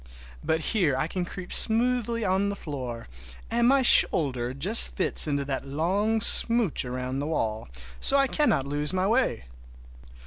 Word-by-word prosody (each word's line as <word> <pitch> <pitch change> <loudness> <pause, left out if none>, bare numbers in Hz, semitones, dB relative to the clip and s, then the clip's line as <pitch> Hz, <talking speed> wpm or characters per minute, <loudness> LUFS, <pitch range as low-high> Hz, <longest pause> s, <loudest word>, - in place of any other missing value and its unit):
But 160 0 -1
here 170 -11 0
I 135 - -1
can 175 +2 -5
creep 180 +1 -9
smoothly 230 0 +1
on 190 +2 -1
the 200 - -5
floor, 130 -9 -8 0.4
and 235 +1 +1
my 270 +1 +2
shoulder 130 - +3
just 180 - +1
fits 185 - +5
in 145 - -2
that 140 -1 -4
long 195 +10 -2
smooch 230 -4 +2
around 125 +1 -5
the 145 - -4
wall, 110 - -4 0.3
so 280 - +4
I 275 - +3
cannot 275 - 0
lose 145 +3 0
my 185 0 -1
way. 225 - -1
175 Hz, 160 wpm, -25 LUFS, 140-225 Hz, 0.4 s, fits